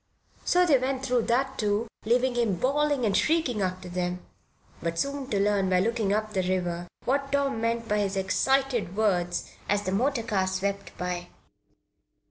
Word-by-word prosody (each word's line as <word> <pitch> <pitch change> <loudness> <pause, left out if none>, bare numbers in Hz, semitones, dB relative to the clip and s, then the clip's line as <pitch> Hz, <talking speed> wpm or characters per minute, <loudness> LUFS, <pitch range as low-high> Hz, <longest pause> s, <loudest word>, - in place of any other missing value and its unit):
So 360 0 +4
they 290 -6 +5
went 265 +1 -2
through 245 -3 +1
that, 265 +3 0
too, 210 +2 +1 0.2
leaving 250 +3 +2
him 235 -5 +1
bawling 280 - +1
and 200 -2 +1
shrieking 305 -8 +2
after 185 -1 -2
them, 180 0 -3 0.6
but 170 0 -2
soon 280 +3 -2
to 200 - 0
learn 200 -1 +2
by 185 -1 +3
looking 220 0 0
up 215 +1 -1
the 190 - +1
river 175 -1 -1 0.2
what 275 +2 0
Tom 280 -5 +1
meant 230 0 -1
by 210 -1 +1
his 195 -1 -1
excited 245 +1 +1
words 180 -5 0 0.2
as 205 0 +2
the 185 - -2
motor 245 +4 +1
car 195 -4 0
swept 195 +1 -3
by. 180 -1 -3
215 Hz, 170 wpm, -27 LUFS, 190-260 Hz, 0.6 s, they